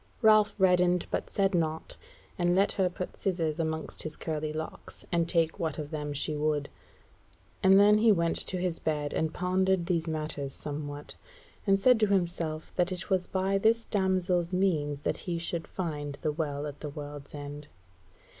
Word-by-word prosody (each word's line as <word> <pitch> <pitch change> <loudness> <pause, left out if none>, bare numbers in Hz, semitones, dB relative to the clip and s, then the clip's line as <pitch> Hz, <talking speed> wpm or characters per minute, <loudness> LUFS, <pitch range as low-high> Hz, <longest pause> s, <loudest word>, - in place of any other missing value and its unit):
Ralph 215 -1 +6
reddened 180 -2 +3
but - - -2
said 195 0 +1
naught, 160 -2 -1 0.4
and 175 0 +2
let 195 +2 +3
her 190 -2 +1
put 180 +1 -6
scizzors 170 -5 -1
amongst 160 -1 -3
his 155 -1 -5
curly 155 -1 -3
locks, 155 +1 -7
and 170 -1 +1
take 165 0 +2
what 165 -3 -2
of 150 -2 -5
them 150 -2 -3
she 145 +2 -1
would. 150 -1 0 0.9
And 190 +1 +7
then 210 +1 +6
he 225 0 +6
went 170 -4 +2
to 185 - -1
his 180 -2 -2
bed, 150 -2 -1
and 160 -1 0
pondered 185 0 +1
these 170 -2 0
matters 155 -3 -1
somewhat, 145 0 -6 0.5
and 195 0 +5
said 245 +4 +5
to 215 - +4
himself 170 -5 -1
that 180 +1 +2
it 185 +3 -5
was 185 -1 +2
by 190 +1 0
this 225 +2 +3
damsel's 185 -3 +1
means 155 -7 0
that - - -1
he 170 - 0
should 165 0 -3
find 150 -5 -4
the 155 - 0
Well 145 -2 -3
at 145 -1 -7
the 150 - -5
World's 145 0 -8
End. 145 0 -7
170 Hz, 175 wpm, -29 LUFS, 150-190 Hz, 0.9 s, And